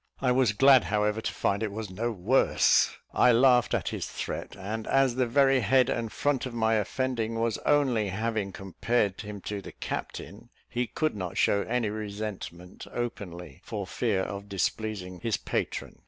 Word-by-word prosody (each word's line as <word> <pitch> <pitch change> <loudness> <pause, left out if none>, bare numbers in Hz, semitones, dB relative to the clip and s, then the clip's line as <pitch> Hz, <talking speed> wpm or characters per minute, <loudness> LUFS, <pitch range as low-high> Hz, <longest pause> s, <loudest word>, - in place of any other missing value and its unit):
I 125 - +2
was 125 -4 +3
glad, 135 +2 +6
however, 105 +1 0
to - - -2
find 100 +1 0
it 110 -2 -1
was 105 -1 -6
no 115 +6 -2
worse. 110 +6 +3 0.2
I 125 - +5
laughed 125 0 +4
at - - -1
his - - -4
threat; - - -5
and, 110 +3 -5
as 135 -2 +3
the 125 0 +1
very 135 +2 +4
head 130 +3 +3
and 115 -2 -2
front 145 -3 0
of 120 - -8
my 110 -1 +2
offending 115 +1 -1
was 115 -2 0
only 130 -8 +3
having 110 0 -2
compared 100 +2 -1
him 105 -2 -7
to 105 0 -4
the - - -9
captain, - - -6 0.2
he 120 0 -2
could 155 -1 -1
not 90 -4 -5
show 100 - +3
any 115 -3 0
resentment 100 -4 -6
openly, 90 - -6
for 105 -4 -4
fear 100 0 0
of 100 +1 -5
displeasing 100 -2 -2
his 115 -2 -1
patron. - - -3
110 Hz, 170 wpm, -28 LUFS, 100-125 Hz, 0.2 s, glad